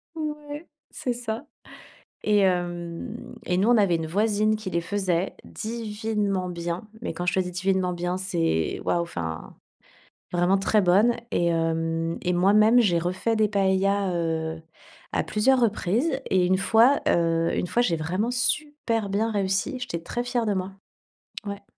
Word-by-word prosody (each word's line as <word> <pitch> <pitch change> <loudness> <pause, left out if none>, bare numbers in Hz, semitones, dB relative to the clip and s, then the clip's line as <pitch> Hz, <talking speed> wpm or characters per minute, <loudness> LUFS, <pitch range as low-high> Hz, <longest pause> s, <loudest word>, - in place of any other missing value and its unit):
Ouais, 300 0 -5 0.2
c'est 250 - -3
ça. 235 +2 -5 0.8
Et 210 -1 +3
hem, 175 +4 -2
et 180 - 0
nous, 205 +5 +3
on 240 - +6
avait 200 -5 +3
une 160 -1 -3
voisine 215 +4 +1
qui 215 -3 -6
les 170 - 0
faisait 185 0 -1
divinement 210 -4 -3
bien. 175 +3 -4
Mais 235 - -3
quand 175 +2 -4
je 180 - +1
te 190 - +3
dis 180 - -2
divinement 185 0 0
bien, 175 +1 -2
c'est, 165 - -1
waouh, 175 - +1
enfin, 80 - -6 0.8
vraiment 175 +2 +3
très 210 +2 +2
bonne. 205 +6 +4
Et 175 - +1
hem, 165 0 0
et 180 -1 0
moi 185 +3 +3
même, 220 +3 +6
j'ai 180 -7 +3
refait 185 +6 -1
des 215 -1 +3
paëlla, 195 -1 +1
heu, 160 -1 -2 0.5
à - - +1
plusieurs 255 +5 +2
reprises, 235 - +1
et 185 -1 +3
1 185 +1 +3
fois, 230 +7 +4
heu, 165 0 +2
1 - - 0
fois, 240 +7 +1
j'ai 170 -8 +1
vraiment 185 +9 -1
super 245 -4 -1
bien 220 +3 0
réussi. 200 +6 -1
J'étais 170 -9 -4
très 240 +7 -3
fière 245 -2 -1
de 205 - +1
moi. 190 +1 -3 0.7
Ouais. 200 0 -6
195 Hz, 165 wpm, -25 LUFS, 175-225 Hz, 0.8 s, on